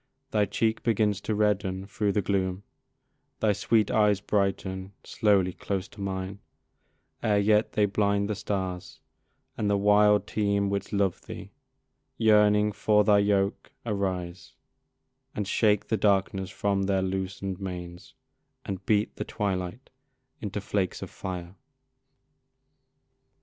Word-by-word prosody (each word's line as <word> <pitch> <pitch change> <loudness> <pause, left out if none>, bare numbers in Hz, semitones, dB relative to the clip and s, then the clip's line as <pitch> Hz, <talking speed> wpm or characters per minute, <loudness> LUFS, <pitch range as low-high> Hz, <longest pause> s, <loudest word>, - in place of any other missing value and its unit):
Thy 105 -3 +3
cheek 110 +3 0
begins 105 -3 +1
to 110 - -2
redden 100 -3 0
thro' 100 0 -1
the 100 0 0
gloom, 95 0 -1 0.8
Thy 110 -2 +3
sweet 110 +1 +2
eyes 105 -2 +3
brighten 95 -1 -1
slowly 95 -4 +2
close 95 0 -3
to 105 - -12
mine, 95 0 -4 0.8
Ere 105 -2 +2
yet 105 +1 +3
they 105 - +3
blind 100 0 +1
the 105 - -1
stars, 95 -3 -4 0.6
and 105 -2 +1
the 100 - +3
wild 105 +1 +4
team 100 -1 0
Which 100 0 -3
love 100 -3 0
thee, - - -8 0.7
yearning 105 -1 +4
for 105 0 +3
thy 105 0 +5
yoke, 100 -1 0
arise, 95 -4 -3 0.8
And 105 -2 -2
shake 105 0 +2
the 110 - +2
darkness 95 -2 +1
from 100 -1 0
their 95 -1 +1
loosen'd 95 0 -3
manes, 90 -2 -7 0.5
And 95 -1 -5
beat 105 -1 +1
the - - -2
twilight 100 +3 -3 0.5
into 105 -1 -3
flakes 95 -2 -2
of - - -8
fire. 90 -2 -6
100 Hz, 130 wpm, -27 LUFS, 95-105 Hz, 0.8 s, thy